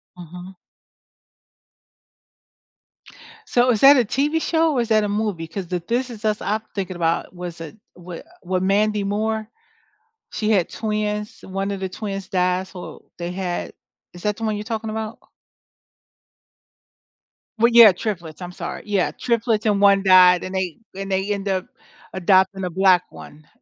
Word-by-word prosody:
Mhm. 180 Hz, +2 st, -11 dB, 2.9 s
So, 250 Hz, -, +3 dB
is 220 Hz, -, 0 dB
that 275 Hz, +4 st, +8 dB
a 250 Hz, -, +4 dB
TV 290 Hz, +8 st, 0 dB
show 325 Hz, -1 st, +1 dB
or 255 Hz, -, +1 dB
is 235 Hz, -, -4 dB
that 215 Hz, -1 st, +3 dB
a -, -, -2 dB
movie? 205 Hz, -5 st, -2 dB
'Cause 180 Hz, +2 st, -6 dB
the 180 Hz, +1 st, -2 dB
"This 250 Hz, +2 st, -1 dB
Is 225 Hz, -2 st, -9 dB
Us" 215 Hz, -1 st, 0 dB
I'm 215 Hz, +1 st, -1 dB
thinking 190 Hz, -2 st, -4 dB
about 165 Hz, +1 st, -1 dB
was 175 Hz, -2 st, -8 dB
a 165 Hz, +5 st, -9 dB, 0.2 s
wa 175 Hz, -1 st, -9 dB, 0.3 s
wa 185 Hz, +1 st, -1 dB
Mandy 205 Hz, +2 st, +1 dB
Moore 215 Hz, +2 st, -2 dB, 0.8 s
she 215 Hz, 0 st, -1 dB
had 195 Hz, -6 st, +2 dB
twins, 210 Hz, -1 st, -3 dB
1 195 Hz, +1 st, -3 dB
of 200 Hz, -, -3 dB
the 190 Hz, 0 st, -3 dB
twins 195 Hz, 0 st, -6 dB
died 185 Hz, -1 st, 0 dB
so 180 Hz, -1 st, -10 dB
they 175 Hz, 0 st, -5 dB
had 180 Hz, -1 st, -4 dB, 0.4 s
is 175 Hz, +2 st, -13 dB
that 210 Hz, -1 st, 0 dB
the -, -, -9 dB
one 215 Hz, -1 st, -1 dB
you're 210 Hz, -, -5 dB
talking 220 Hz, 0 st, -4 dB
about? 220 Hz, 0 st, -5 dB, 2.4 s
Well, 235 Hz, +2 st, +4 dB
yeah, 230 Hz, -4 st, +10 dB
triplets, 180 Hz, -4 st, -5 dB
I'm 180 Hz, -, -6 dB
sorry. -, -, -7 dB
Yeah, 200 Hz, -3 st, 0 dB
triplets 230 Hz, -2 st, -1 dB
and 205 Hz, -2 st, +2 dB
1 200 Hz, -1 st, +5 dB
died 185 Hz, -2 st, +6 dB
and 185 Hz, -, -6 dB
they 185 Hz, -3 st, -2 dB, 0.2 s
and 195 Hz, 0 st, -5 dB
they 190 Hz, +2 st, 0 dB
end 200 Hz, 0 st, -5 dB
up 190 Hz, -1 st, -1 dB, 0.5 s
adopting 190 Hz, +1 st, +2 dB
a 180 Hz, -, -2 dB
black 185 Hz, 0 st, +3 dB
one, 150 Hz, +1 st, -13 dB
195 Hz, 165 wpm, -21 LUFS, 180-215 Hz, 2.9 s, yeah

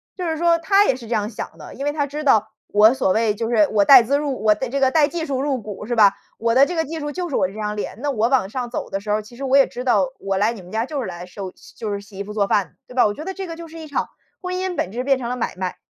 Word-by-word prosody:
就 360 Hz, -3 st, -3 dB
是 320 Hz, -1 st, -1 dB
说 335 Hz, 0 st, +3 dB
她 395 Hz, +4 st, +4 dB
也 255 Hz, -, +2 dB
是 235 Hz, -3 st, -10 dB
这 235 Hz, -, -2 dB
样 210 Hz, -1 st, 0 dB
想 220 Hz, -, -7 dB
的， -, -, -11 dB
因 275 Hz, +3 st, -5 dB
为 290 Hz, -, +1 dB
她 290 Hz, -1 st, -1 dB
知 295 Hz, +2 st, -5 dB
道 220 Hz, -6 st, +3 dB, 0.2 s
我 215 Hz, +4 st, +5 dB
所 190 Hz, -7 st, +1 dB
谓， 220 Hz, 0 st, +2 dB
就 225 Hz, +2 st, -3 dB
是 215 Hz, -4 st, +4 dB
我 205 Hz, -2 st, +4 dB
带 260 Hz, +1 st, +9 dB
资 280 Hz, +5 st, +1 dB
入 275 Hz, -6 st, -3 dB
我 215 Hz, -, +6 dB
这 260 Hz, +4 st, -3 dB
个 265 Hz, -1 st, +3 dB
带 305 Hz, -3 st, +4 dB
技 325 Hz, +1 st, -4 dB
术 270 Hz, -3 st, -2 dB
入 275 Hz, -3 st, 0 dB
股 210 Hz, 0 st, -8 dB
是 240 Hz, -, -1 dB
吧？ 205 Hz, -3 st, +6 dB, 0.2 s
我 230 Hz, 0 st, +1 dB
的 275 Hz, +3 st, +6 dB
这 355 Hz, -, -4 dB
个 325 Hz, -1 st, 0 dB
技 320 Hz, +2 st, -5 dB
术 295 Hz, 0 st, -4 dB
就 355 Hz, +1 st, -4 dB
是 -, -, -3 dB
我 185 Hz, -, +2 dB
这 195 Hz, -, -12 dB
张 210 Hz, -1 st, -3 dB
脸， 205 Hz, -1 st, -5 dB
那 290 Hz, -, +1 dB
我 225 Hz, -2 st, +1 dB
往 255 Hz, -8 st, +2 dB
上 245 Hz, +2 st, -4 dB
走 -, -, -5 dB
的 195 Hz, -, -1 dB
时 210 Hz, +1 st, -9 dB
候 210 Hz, -, +3 dB
儿， -, -, -3 dB
其 240 Hz, +3 st, -15 dB
实 275 Hz, -, -8 dB
我 270 Hz, +1 st, +4 dB
也 275 Hz, -, +7 dB
知 250 Hz, -, -7 dB
道， 260 Hz, +2 st, +3 dB
我 195 Hz, -1 st, -2 dB
来 215 Hz, +4 st, +2 dB
你 210 Hz, -, -10 dB
们 180 Hz, +2 st, -14 dB
家 225 Hz, +2 st, -1 dB
就 290 Hz, -1 st, -4 dB
是 230 Hz, -, -4 dB
来 175 Hz, 0 st, -7 dB
收 185 Hz, +1 st, -7 dB, 0.2 s
就 215 Hz, -3 st, -4 dB
是 200 Hz, -, -2 dB
洗 200 Hz, -1 st, -13 dB
衣 -, -, -2 dB
服 210 Hz, -, -9 dB
做 205 Hz, -2 st, +1 dB
饭， 200 Hz, -2 st, 0 dB
对 250 Hz, -, -12 dB
吧？ 250 Hz, -4 st, +4 dB
我 205 Hz, -, -3 dB
觉 305 Hz, -, -8 dB
得 385 Hz, -, -4 dB
这 385 Hz, -1 st, -6 dB
个 330 Hz, -, -6 dB
就 335 Hz, 0 st, -9 dB
是 325 Hz, +1 st, -11 dB
一 315 Hz, -, -8 dB
场 290 Hz, -, -2 dB, 0.3 s
婚 365 Hz, 0 st, -3 dB
姻 370 Hz, -1 st, -2 dB
本 185 Hz, -, -2 dB
质 245 Hz, +3 st, -3 dB
变 270 Hz, 0 st, +3 dB
成 240 Hz, -1 st, -4 dB
了 250 Hz, -, -2 dB
买 240 Hz, -, -3 dB
卖， 185 Hz, -1 st, -4 dB
245 Hz, 365 characters per minute, -21 LUFS, 210-290 Hz, 0.3 s, 带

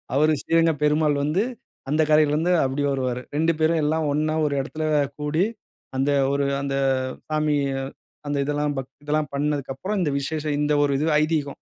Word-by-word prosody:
அவரு 155 Hz, +2 st, +4 dB
ஸ்ரீரங்கப் 165 Hz, -3 st, +2 dB
பெருமாள் 150 Hz, 0 st, +3 dB
வந்து, 155 Hz, +8 st, +1 dB, 0.5 s
அந்த 155 Hz, +2 st, +2 dB
கரையிலருந்து 155 Hz, +3 st, +3 dB
அப்படி 135 Hz, +2 st, -1 dB
வருவாரு. 130 Hz, -2 st, -1 dB
2 160 Hz, +2 st, +3 dB
பேரும் 160 Hz, 0 st, +2 dB
எல்லாம் 155 Hz, +1 st, +1 dB
ஒண்ணா 155 Hz, +2 st, 0 dB
ஒரு 145 Hz, -, 0 dB
இடத்தில 155 Hz, +3 st, -5 dB, 0.4 s
கூடி, 150 Hz, +5 st, +1 dB, 0.5 s
அந்த 135 Hz, +2 st, +1 dB, 0.2 s
ஒரு 140 Hz, 0 st, +1 dB, 0.2 s
அந்த 140 Hz, -1 st, -2 dB, 0.6 s
சாமி 155 Hz, -1 st, +1 dB, 0.7 s
அந்த 145 Hz, 0 st, -1 dB
இதெல்லாம் 145 Hz, +1 st, -1 dB
பக் 135 Hz, 0 st, -5 dB
இதெல்லாம் 150 Hz, -1 st, -1 dB
பண்ணதுக்கப்புறம், 145 Hz, +6 st, -2 dB
இந்த 165 Hz, -5 st, +1 dB
விசேஷம். 150 Hz, +1 st, -2 dB
இந்த 150 Hz, 0 st, +1 dB
ஒரு 145 Hz, -1 st, +2 dB
இது 150 Hz, -, 0 dB, 0.2 s
ஐதீகம். 155 Hz, -3 st, -1 dB
150 Hz, 155 wpm, -24 LUFS, 145-155 Hz, 0.7 s, அவரு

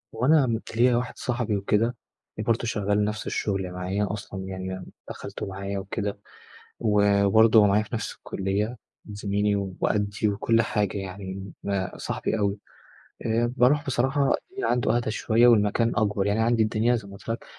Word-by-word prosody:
هو 115 Hz, +3 st, 0 dB
أنا 130 Hz, -6 st, +3 dB
ليَّا 120 Hz, +1 st, +4 dB
واحد 125 Hz, +1 st, -2 dB
صاحبي 120 Hz, -4 st, -1 dB
وكده، 105 Hz, +4 st, +1 dB, 0.4 s
برضه 115 Hz, +2 st, +1 dB
شغَّال 105 Hz, -2 st, +1 dB
نفس 105 Hz, +1 st, -4 dB
الشغل 95 Hz, -3 st, -2 dB
معايا 95 Hz, +3 st, -2 dB
أصلًا 100 Hz, -2 st, -6 dB
يعني، 95 Hz, -1 st, -5 dB, 0.2 s
دخَّلته -, -, -6 dB
معايا 100 Hz, +1 st, -4 dB
وكده، 100 Hz, +1 st, -4 dB, 0.6 s
و 100 Hz, -2 st, +3 dB
وبرضه 110 Hz, +3 st, +6 dB
هو 105 Hz, -, +6 dB
معايا 100 Hz, +1 st, +3 dB
في 110 Hz, -, -8 dB
نفس 110 Hz, -, -3 dB
الكلية، 100 Hz, +5 st, -2 dB, 0.3 s
زميلي 100 Hz, 0 st, 0 dB, 0.2 s
وقديّ 105 Hz, 0 st, 0 dB
وكل 115 Hz, +3 st, +2 dB
حاجة 105 Hz, -3 st, -1 dB
يعني. 95 Hz, 0 st, -7 dB
ما 100 Hz, -2 st, -2 dB
صاحبي 110 Hz, -, -2 dB
أوي. 100 Hz, -1 st, 0 dB, 0.7 s
آآ، 115 Hz, +2 st, +1 dB
باروح 140 Hz, +4 st, +3 dB
بصراحة، 135 Hz, +2 st, +1 dB, 0.2 s
الدنيا 395 Hz, +1 st, -3 dB
عنده 120 Hz, -1 st, +2 dB
أهدى 120 Hz, -2 st, -1 dB
شوية، 115 Hz, +2 st, +3 dB
والمكان 115 Hz, +1 st, +3 dB
أكبر. 105 Hz, -3 st, +1 dB
يعني، 100 Hz, +2 st, +1 dB
عندي 115 Hz, 0 st, +3 dB
الدنيا 110 Hz, +3 st, +2 dB
زي 100 Hz, -3 st, -7 dB
ما 100 Hz, -, -11 dB
قُلت -, -, -16 dB
لك، 115 Hz, +1 st, -3 dB
105 Hz, 160 wpm, -26 LUFS, 100-115 Hz, 0.7 s, وبرضه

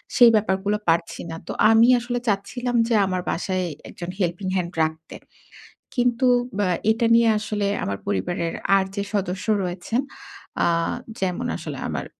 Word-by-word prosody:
সেই 240 Hz, -2 st, +8 dB
ব্যাপারগুলো 205 Hz, 0 st, +1 dB
পারছি 170 Hz, +1 st, 0 dB
না। -, -, -5 dB
তো -, -, -4 dB, 0.2 s
আমি 225 Hz, +2 st, +6 dB
আসলে 245 Hz, 0 st, -3 dB
চাচ্ছিলাম 240 Hz, +5 st, -1 dB
যে 235 Hz, -, +2 dB
আমার 185 Hz, -1 st, -1 dB
বাসায় 185 Hz, +1 st, -1 dB, 0.2 s
একজন 175 Hz, 0 st, -7 dB
helping 180 Hz, +2 st, -1 dB
hand 175 Hz, 0 st, -3 dB
রাখতে। 160 Hz, +1 st, -7 dB, 0.8 s
কিন্তু 245 Hz, 0 st, +2 dB, 0.3 s
ব্য 205 Hz, -, +1 dB, 0.3 s
এটা 230 Hz, +1 st, +1 dB
নিয়ে 230 Hz, -1 st, +5 dB
আসলে 210 Hz, -1 st, -2 dB, 0.2 s
আমার 100 Hz, 0 st, -2 dB
পরিবারের 165 Hz, -, -1 dB, 0.2 s
আর 190 Hz, -, +1 dB
যে 200 Hz, -, -1 dB
সদস্য 195 Hz, -2 st, -2 dB, 0.2 s
রয়েছেন 180 Hz, +7 st, -2 dB, 0.6 s
অ্যা -, -, +3 dB, 0.5 s
যেমন 180 Hz, -2 st, -1 dB
আসলে -, -, -6 dB
আমার -, -, -3 dB
195 Hz, 150 wpm, -23 LUFS, 175-230 Hz, 0.8 s, সেই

